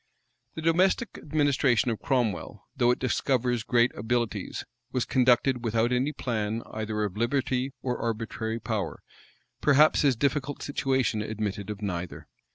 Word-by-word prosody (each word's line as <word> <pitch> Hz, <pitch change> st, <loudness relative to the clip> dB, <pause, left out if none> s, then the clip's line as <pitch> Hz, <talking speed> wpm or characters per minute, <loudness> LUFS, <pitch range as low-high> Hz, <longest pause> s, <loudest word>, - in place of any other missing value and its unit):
The 160 Hz, -, -5 dB
domestic 185 Hz, +7 st, +2 dB
administration 140 Hz, -5 st, +2 dB
of 110 Hz, -, -3 dB
Cromwell, 120 Hz, -, -1 dB
though 120 Hz, -, +3 dB
it 125 Hz, -, +3 dB
discovers 125 Hz, -2 st, 0 dB
great 120 Hz, +1 st, +2 dB
abilities, 120 Hz, +1 st, -2 dB, 0.3 s
was 125 Hz, -2 st, 0 dB
conducted 125 Hz, 0 st, +3 dB
without 115 Hz, +1 st, +1 dB
any 125 Hz, +4 st, +1 dB
plan 115 Hz, -5 st, -2 dB
either 110 Hz, 0 st, -2 dB
of 100 Hz, -1 st, -3 dB
liberty 130 Hz, +2 st, 0 dB
or 125 Hz, -1 st, -2 dB
arbitrary 115 Hz, 0 st, -3 dB
power: 110 Hz, -7 st, -3 dB, 0.6 s
perhaps 150 Hz, +1 st, +5 dB
his 140 Hz, -3 st, +3 dB
difficult 140 Hz, +2 st, -1 dB
situation 130 Hz, -5 st, 0 dB
admitted 105 Hz, -2 st, -3 dB
of 105 Hz, 0 st, -5 dB
neither. 90 Hz, -4 st, -4 dB
120 Hz, 135 wpm, -27 LUFS, 110-135 Hz, 0.6 s, perhaps